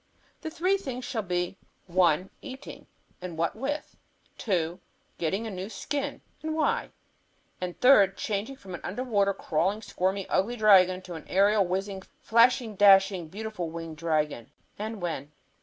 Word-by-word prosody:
The 320 - -4
three 360 +5 +1
things 255 -9 -6
shall 230 -4 -2
be, 180 0 -2 0.3
one, 180 0 +2
eating, 265 0 -9 0.3
and 175 -3 -6
what 165 0 0
with; 285 +6 -4 0.4
two, 175 -4 -1 0.4
getting 190 +7 -1
a 220 - -4
new 190 +1 -5
skin, 285 +4 -4 0.2
and 315 0 -3
why; 315 - +1 0.7
and 180 -1 -4
third, 205 -7 +6
changing 215 +6 -3
from 195 -7 -11
an 175 - -6
under 210 +8 -3
water, 200 -5 +2
crawling, 190 +7 -1
squirmy, 190 +1 -1
ugly 205 +6 +1
dragon 195 -5 +6
into 185 -1 -9
an 160 - -9
aerial, 200 0 +3
whizzing, 190 +1 -2 0.2
flashing, 230 -1 +3
dashing, 195 -3 +5
beautiful 205 -1 -5
winged 165 -1 -7
dragon, 155 -7 -1 0.3
and 215 -2 -5
when. 150 -4 -4
195 Hz, 150 wpm, -28 LUFS, 175-225 Hz, 0.7 s, third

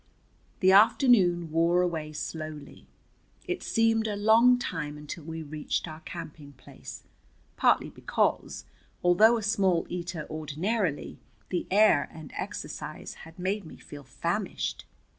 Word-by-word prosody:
The 190 0 +6
afternoon 195 - +5
wore 170 +2 +3
away 160 -4 -2
slowly. 155 -1 -7 0.6
It 365 -1 -3
seemed 225 0 +2
a 210 - -2
long 225 +4 +5
time 150 -10 -4
until 150 +2 -8
we 160 0 -6
reached 150 +3 -3
our 155 -1 -8
camping 155 -4 -9
place, 130 - -11 0.5
partly - - +2
because, - - -1 0.4
although 215 +7 +5
a 220 - -4
small 195 -5 +2
eater 175 -2 -4
ordinarily, 155 +3 -2 0.3
the 180 - -2
air 210 -5 +4
and 155 -2 -11
exercise - - -6 0.2
had 165 - -19
made 195 +3 -2
me 160 - -12
feel 145 -1 -11
famished. - - -3
175 Hz, 125 wpm, -28 LUFS, 155-210 Hz, 0.6 s, The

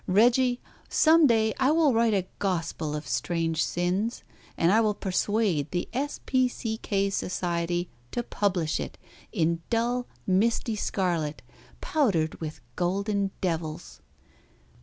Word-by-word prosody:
Reggie, 245 +5 +4 0.3
some 320 -1 +6
day 220 -2 +3
I 265 +1 +4
will 310 -3 +4
write 230 -1 +3
a 190 -2 0
gospel 165 -5 -1
of 150 0 -5
strange 165 +6 0
sins, 185 +7 -1 0.3
and 165 +2 +3
I 220 +3 +5
will 210 -2 +1
persuade 190 -5 0
the 175 -1 -2
S. 280 +4 -2
P. 255 -1 +3
C. 225 -2 -4
K. 200 -2 0
Society 175 -2 -1 0.2
to 240 - -2
publish 185 -8 0
it - - -5 0.3
in 165 -4 +1
dull, 240 +2 0 0.2
misty 220 +4 +1
scarlet, 170 -8 -1 0.4
powdered 190 - +1
with 155 -1 -6
golden 200 +3 0
devils." 160 - -3
195 Hz, 130 wpm, -27 LUFS, 170-230 Hz, 0.4 s, some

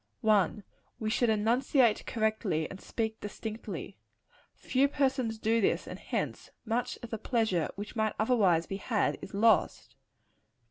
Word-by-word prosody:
1. 210 -2 +2 0.4
We 215 - -1
should 240 0 +2
enunciate 230 +2 +2
correctly, 215 -8 0
and 195 - -9
speak 220 -1 -3
distinctly. 215 +2 -6 0.6
Few 270 +2 +2
persons 260 -5 0
do 225 +1 +1
this; - - +1
and - - -8
hence - - -3 0.2
much 240 +2 -1
of 235 - -8
the 225 - -3
pleasure 220 - 0
which 205 +1 -7
might 220 -1 0
otherwise 200 -8 +3
be 195 - -4
had, 210 +1 0
is 195 - -8
lost. 220 0 +2
220 Hz, 140 wpm, -30 LUFS, 205-235 Hz, 0.6 s, otherwise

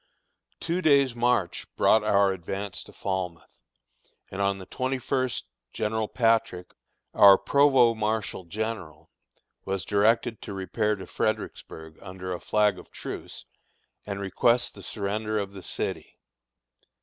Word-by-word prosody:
Two 175 +2 -1
days' 140 -6 +4
march 120 -7 0
brought 110 -1 +4
our 100 -2 +3
advance 95 +2 -5
to - - -12
Falmouth, 95 -4 -3 0.9
and 95 - -4
on 100 0 +1
the 95 - -9
twenty 130 +4 -2
first 130 - -1 0.3
General 110 0 -1
Patrick, 115 -7 +1 0.4
our 100 -1 +8
provost 135 -5 +4
marshal 105 -3 -1
general, 105 -4 -5 0.5
was 95 -3 -3
directed 110 +2 +2
to 100 - -7
repair 105 +3 -1
to 95 - -9
Fredericksburg 80 0 -4
under 95 -1 -6
a 90 - -5
flag 105 -1 +1
of - - -14
truce, - - -8 0.6
and 100 -1 -5
request 115 +5 +1
the - - -12
surrender 105 +1 -3
of 100 -1 -3
the 95 - -9
city. - - -4
105 Hz, 130 wpm, -27 LUFS, 95-115 Hz, 0.9 s, our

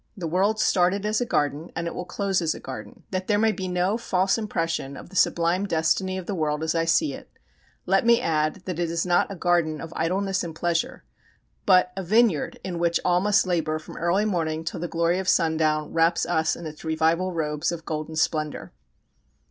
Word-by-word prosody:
The 180 - -5
world 195 +6 +1
started 190 +2 +2
as 215 +2 0
a 245 - -1
garden 150 -2 -1
and 165 +1 -3
it 170 - -3
will 180 - -5
close 195 +1 -1
as 160 -2 0
a - - -8
garden. 110 -6 -9
That 185 -1 -3
there 210 - +3
may 220 +1 +3
be 190 -3 -4
no 180 +5 0
false 190 -3 +1
impression 165 -10 -2
of - - -11
the 190 - -14
sublime 175 +2 +2
destiny 185 +3 +1
of 185 - -6
the 205 - -3
world 155 -3 -1
as 160 - 0
I 165 -1 +1
see 295 - +2
it, - - -10 0.6
let 195 0 +3
me 235 0 +5
add 155 +3 -1
that 180 -3 -4
it 170 -1 0
is 170 +1 -1
not 175 +2 +2
a - - -5
garden 170 -4 +1
of 165 +2 -8
idleness 190 +3 0
and 165 -2 -6
pleasure, 170 0 -1 0.6
but 180 0 +5
a 195 - -3
vineyard 210 -3 +2
in 175 -3 -4
which 170 0 +2
all 180 0 +3
must 205 0 +3
labour 160 -4 0
from 155 - -11
early 175 +5 +1
morning 160 -5 -1
till 165 - -4
the 175 - -3
glory 170 +2 +1
of 190 - -1
sundown 155 -2 +1
wraps 165 +1 +2
us 160 -2 +1
in 170 - -9
its 155 -1 -8
revival 160 +3 +1
robes 155 -1 -1
of 165 -1 -6
golden 155 0 -4
splendour. 155 - -1
170 Hz, 210 wpm, -25 LUFS, 160-190 Hz, 0.6 s, me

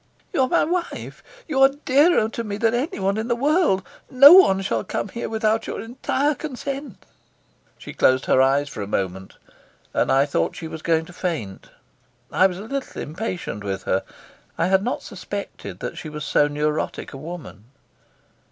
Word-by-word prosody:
"You - - +2
are 260 - +3
my - - +3
wife; 345 +2 -3 0.3
you 275 -4 0
are 270 - +8 0.2
dearer 285 -3 +4
to 230 +1 -5
me 205 -2 -4
than 225 +1 +2
anyone 210 - -1
in 220 +1 -2
the 240 - +1
world. 280 - +2 0.2
No 275 +5 +9
one 195 - +7
shall - - -1
come - - -3
here 235 - -5
without 220 0 0
your - - -4
entire 265 +5 -1
consent." 275 - -6 0.7
She - - -10
closed 130 0 +3
her 130 - +4
eyes 140 +2 +3
for 110 - -7
a 100 - -4
moment, 95 -1 -3 0.6
and - - +1
I 135 +1 +4
thought 85 - -1
she 165 - -6
was 160 0 -8
going 160 -1 +1
to 180 - -13
faint. 160 - -4 0.6
I 190 - +5
was 180 -2 -6
a 195 - -7
little 275 +4 -5
impatient 160 - -5
with 95 -1 -4
her; 95 - 0 0.6
I 165 - +1
had 190 0 +3
not 245 - -2
suspected - - -7
that - - -5
she 155 - -7
was 150 -1 -6
so 145 - +3
neurotic 150 +1 -2
a - - -7
woman. 155 - -9
195 Hz, 180 wpm, -22 LUFS, -, 0.7 s, No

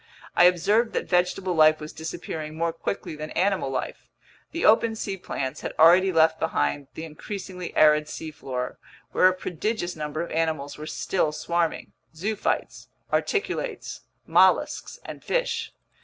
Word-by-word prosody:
I 175 - +7
observed 205 +6 +3
that - - -2
vegetable 180 +1 +1
life 155 -1 +5
was 150 0 -8
disappearing 160 -1 -6
more 165 0 0
quickly 165 0 -4
than 155 0 -6
animal 190 -6 +1
life. 130 -1 -5 0.4
The 335 - -2
open 225 +1 +5
sea 200 -3 -3
plants 135 -8 -4
had - - -4
already 180 +4 +6
left 160 -1 +4
behind 140 - -1
the 160 - -5
increasingly 180 +3 -7
arid 150 0 +5
seafloor, 135 -6 -5 0.3
where 185 - +5
a 185 - +4
prodigious 180 +1 -3
number 155 0 -4
of 170 - -8
animals 160 -3 -1
were 155 +1 -8
still 160 -3 0
swarming: 170 +1 -1 0.2
zoophytes, 205 +6 -2 0.3
articulates, 420 +2 -2 0.2
mollusks, - - +3
and - - -8
fish. - - -1
165 Hz, 140 wpm, -25 LUFS, 155-185 Hz, 0.4 s, I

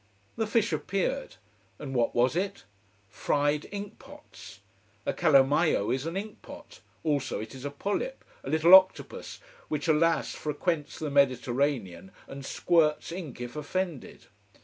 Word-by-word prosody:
The 225 -1 -1
fish 225 0 +1
appeared. - - -2 0.4
And 135 -2 -7
what 120 -2 +1
was 125 +5 +3
it? 195 +2 -2 0.4
Fried 145 +8 0
ink 205 +1 -7
pots. 285 - -14 0.4
A - - 0
calamaio 145 - +3
is 135 +4 -2
an 165 +3 -3
ink 210 +2 -6
pot: - - -12 0.2
also 145 -4 -1
it 110 +3 -7
is 135 +1 -9
a - - -1
polyp, 205 - -3 0.2
a - - -6
little 160 +3 +4
octopus 190 0 +4 0.3
which, 150 0 -3
alas, 165 +1 +2
frequents 155 0 -2
the 155 -2 -4
Mediterranean 125 - +1 0.2
and 140 0 -8
squirts 155 +2 +1
ink 165 -8 -7
if 120 +2 -6
offended. 160 -1 -4
150 Hz, 140 wpm, -28 LUFS, 135-185 Hz, 0.4 s, little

